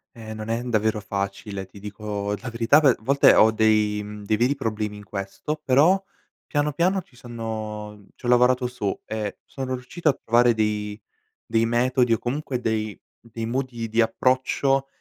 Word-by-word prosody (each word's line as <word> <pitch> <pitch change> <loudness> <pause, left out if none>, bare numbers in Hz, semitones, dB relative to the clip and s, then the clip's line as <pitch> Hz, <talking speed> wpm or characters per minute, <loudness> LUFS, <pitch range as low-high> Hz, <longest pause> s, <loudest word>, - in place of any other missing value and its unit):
Eh 110 -1 -8
non 110 0 -6
è 115 +1 0
n 125 - -5
davvero 110 -1 +1
facile, 100 0 -4
ti 95 +2 -15
dico 105 0 -4
la 125 - -6
verità 115 +5 +4
ve 140 -5 +5
volte 140 +5 +5
ho 110 - +6
dei, 110 -1 +2
mhmm, 105 0 -8
dei 110 +1 +1
veri 125 +5 +3
problemi 110 -5 -3
in 105 - -11
questo 100 +10 -5
però 150 +9 +5 0.5
piano, 145 0 0
piano 180 +6 +1
ci 140 - -25
sono 110 -3 -6
c'ho - - -8
lavorato 125 +1 +4
su 120 -5 -3
e 105 -2 -4
sono 130 -2 -5
riuscito 130 +6 -1
a - - +4
trovare 120 0 +3
dei 105 -1 -2 0.4
dei 115 0 +1
metodi 125 +1 +2
o 115 - +1
comunque 130 0 -3
dei 110 -2 -1 0.2
dei 115 -1 -6
modi 120 -2 -3
di 115 +2 +3
approccio 130 +3 +1
115 Hz, 170 wpm, -24 LUFS, 105-130 Hz, 0.5 s, ho